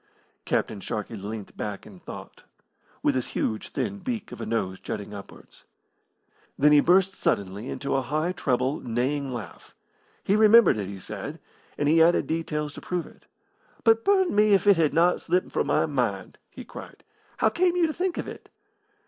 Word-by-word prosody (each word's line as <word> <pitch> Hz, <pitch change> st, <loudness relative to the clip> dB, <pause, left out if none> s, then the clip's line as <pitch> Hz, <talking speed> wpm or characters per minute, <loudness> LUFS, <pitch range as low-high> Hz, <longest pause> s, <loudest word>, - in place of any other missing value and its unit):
Captain 100 Hz, -, -1 dB
Sharkey 105 Hz, +3 st, -4 dB
leant 105 Hz, 0 st, -7 dB
back 105 Hz, -2 st, -5 dB
in 100 Hz, -4 st, -13 dB
thought, -, -, -10 dB, 0.6 s
with -, -, +3 dB
his 130 Hz, -2 st, -1 dB
huge 110 Hz, -1 st, -2 dB
thin 205 Hz, 0 st, -3 dB
beak 225 Hz, +3 st, -4 dB
of -, -, -8 dB
a -, -, -4 dB
nose 95 Hz, -5 st, -2 dB
jutting 105 Hz, 0 st, -6 dB
upwards. 100 Hz, -1 st, -12 dB, 0.9 s
Then 150 Hz, +1 st, +5 dB
he 150 Hz, -, +7 dB
burst 185 Hz, +5 st, +4 dB
suddenly 100 Hz, -, -2 dB
into 140 Hz, -, -3 dB
a 135 Hz, -, +2 dB
high 155 Hz, +7 st, -1 dB
treble, 130 Hz, -3 st, 0 dB
neighing 130 Hz, +4 st, -1 dB
laugh. 120 Hz, -4 st, -8 dB, 0.5 s
He 200 Hz, -, +2 dB
remembered 215 Hz, -, +6 dB
it, 100 Hz, -3 st, -3 dB
he 100 Hz, 0 st, -7 dB
said, -, -, -6 dB, 0.4 s
and 145 Hz, -, 0 dB
he 160 Hz, +2 st, +5 dB
added 170 Hz, +2 st, +4 dB
details 150 Hz, -2 st, -2 dB
to -, -, -9 dB
prove 180 Hz, -2 st, -3 dB
it. -, -, -18 dB, 0.6 s
"But 225 Hz, -1 st, +4 dB
burn 380 Hz, -2 st, +3 dB
me 210 Hz, 0 st, +4 dB
if 195 Hz, -, 0 dB
it 200 Hz, -3 st, +6 dB
had 160 Hz, -3 st, +3 dB
not 175 Hz, +2 st, +3 dB
slipped 180 Hz, +1 st, 0 dB
from -, -, 0 dB
my -, -, +2 dB
mind!" 120 Hz, -11 st, -2 dB
he -, -, -10 dB
cried. -, -, -11 dB, 0.3 s
"How 220 Hz, -, +3 dB
came 350 Hz, +8 st, +1 dB
you 350 Hz, -2 st, +3 dB
to 315 Hz, -, -1 dB
think 360 Hz, +1 st, -2 dB
of -, -, -3 dB
it?" -, -, -10 dB
150 Hz, 180 wpm, -26 LUFS, -, 0.9 s, he